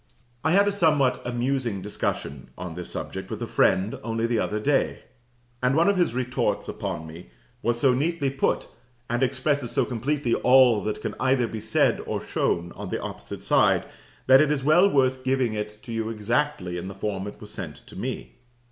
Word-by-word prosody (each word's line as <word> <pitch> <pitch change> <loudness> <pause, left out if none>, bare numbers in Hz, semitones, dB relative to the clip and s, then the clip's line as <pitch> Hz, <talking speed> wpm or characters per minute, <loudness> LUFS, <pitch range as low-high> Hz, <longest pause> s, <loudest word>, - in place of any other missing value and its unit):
I 160 - +2
had 200 +2 +5
a - - +3
somewhat 150 -9 +2
amusing 120 -4 -1
discussion 70 -9 -3
on 90 -2 -6
this 90 +1 -6
subject - - -5
with - - -5
a - - -3
friend, 95 +3 +2
only 115 0 -1
the 115 -1 +1
other 105 - -1
day; 140 +5 0 0.6
and 125 +2 +2
one 165 +3 +4
of 200 - +4
his 175 -10 +1
retorts 125 0 -1
upon 80 - -4
me 80 +3 -11 0.3
was 120 0 0
so 130 0 +4
neatly 145 +1 0
put, 135 - 0 0.4
and 120 +1 0
expresses 135 0 0
so - - +1
completely 125 +1 -1
all 125 -4 +5
that 105 - -2
can - - -2
either 130 -2 +2
be 110 - -5
said 110 +1 +2
or - - -1
shown 85 0 -1
on - - -7
the - - -2
opposite - - -7
side, - - +3 0.4
that 130 +2 +7
it 155 - +3
is 145 -3 0
well 175 +7 +5
worth 130 -5 +2
while 130 - -19
giving 130 -3 +1
it 105 +2 -6
you 115 -1 -2
exactly 115 -4 -1
in 90 - -6
the 95 - -7
form 100 -1 -3
it 105 - -9
was 105 -1 -9
sent 85 -9 -6
to - - -14
me. - - -5
125 Hz, 195 wpm, -25 LUFS, 105-135 Hz, 0.6 s, that